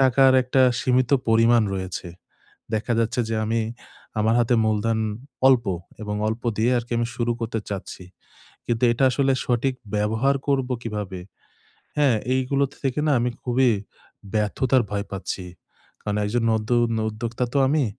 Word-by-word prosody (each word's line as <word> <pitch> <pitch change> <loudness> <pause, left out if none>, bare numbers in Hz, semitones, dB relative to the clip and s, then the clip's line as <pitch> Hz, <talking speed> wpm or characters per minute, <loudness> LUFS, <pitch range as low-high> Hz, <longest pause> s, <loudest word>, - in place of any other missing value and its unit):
টাকার 130 0 +5
একটা 130 +1 +2 0.2
সীমিত 125 0 +2 0.2
পরিমাণ 115 +1 +5
রয়েছে। 95 -1 -5 0.7
দেখা 110 +2 0
যাচ্ছে 115 +2 0
যে 110 - -1
আমি 115 +1 0 0.6
আমার 110 +1 +3
হাতে 120 +1 +3
মূলধন 110 +1 +1 0.5
অল্প 130 -3 +4 0.4
এবং 105 -1 -3
অল্প 110 +2 -3
দিয়ে 115 +3 +2
আরকি 120 0 -5
আমি 120 - 0
শুরু 120 -1 0
করতে 115 -1 -2
চাচ্ছি। 95 -2 -6 0.6
কিন্তু 115 0 -1
এটা 135 +3 +1
আসলে 135 +1 +2
সঠিক 125 +2 0 0.2
ব্যবহার 110 +6 +1
করবো 135 -2 +1
কীভাবে? 105 -5 -5 0.8
হ্যাঁ, 140 -6 +4 0.2
এইগুলো 130 +2 +1 0.2
থেকে 135 +1 -1
না 150 - +3
আমি 120 +1 0
খুবই 125 0 +3 0.6
ব্যর্থতার 125 +5 +2
ভয় 100 0 -2
পাচ্ছি। 95 -1 -4 0.6
কারণ 105 -1 -3
একজন 115 +3 0
নতুন 115 +2 +1 0.2
উদ্যোক্তা 115 +3 -3
তো - - +3
আমি 150 -1 +2
120 Hz, 145 wpm, -23 LUFS, 110-130 Hz, 0.8 s, টাকার